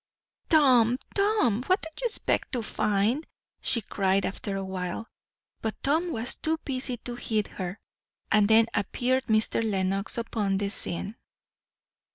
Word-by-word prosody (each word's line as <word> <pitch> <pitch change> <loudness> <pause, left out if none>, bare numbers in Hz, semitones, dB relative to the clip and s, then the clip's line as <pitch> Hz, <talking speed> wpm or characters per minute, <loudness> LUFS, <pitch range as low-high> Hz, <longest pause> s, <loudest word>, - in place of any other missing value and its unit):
"Tom 250 -6 +5 0.2
Tom! 395 - +2
what 370 +1 +2
do 320 - -3
you - - +2
expect 460 - +1
to 240 -3 +1
find?" 215 +8 0 0.3
she 230 - +3
cried 195 -1 0
after 195 0 -3
awhile. 190 +2 -4 0.5
But 220 -2 -2
Tom 325 +5 +1
was 235 -4 -1
too 320 +1 -1
busy 255 -2 -2
to 240 +2 -6
heed 220 -3 -1
her. 185 +2 -6 0.5
And 210 -2 +5
then 220 +1 +6
appeared 255 +6 0
Mr. 220 +1 +2
Lenox 195 -1 -1
upon 210 -4 -1
the 200 0 -1
scene. 205 +1 -1
225 Hz, 140 wpm, -27 LUFS, 200-255 Hz, 0.5 s, then